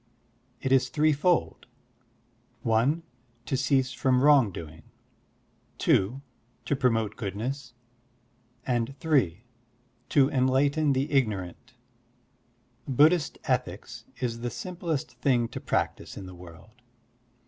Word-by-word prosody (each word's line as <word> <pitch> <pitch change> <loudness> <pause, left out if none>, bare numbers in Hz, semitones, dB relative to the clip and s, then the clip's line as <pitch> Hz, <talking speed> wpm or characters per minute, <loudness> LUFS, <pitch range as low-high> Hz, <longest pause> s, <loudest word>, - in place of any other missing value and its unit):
It 130 - -2
is 135 -1 +4
threefold: 155 +3 +1 1.0
(i) 115 +6 +3 0.5
to 135 - -1
cease 130 -1 +1
from 130 -1 +2
wrong 140 -8 +6
doing, 80 -2 -9 1.0
(2) 120 +9 +1 0.4
to 145 - 0
promote 115 -5 +1
goodness, 125 +5 -5 0.9
and 120 0 -1
(3) 125 - +1 0.7
to 140 -2 +4
enlighten 140 +3 +2
the 135 +2 -1
ignorant. 105 -10 -1 1.1
Buddhist 150 +5 +3
ethics - - -3
is 115 -2 -2
the 120 +1 -3
simplest 175 - -4
thing 120 -4 +2
to - - -6
practise - - -2
in 95 - -7
the 95 - -10
world. 90 +7 -14
130 Hz, 105 wpm, -27 LUFS, 115-140 Hz, 1.1 s, wrong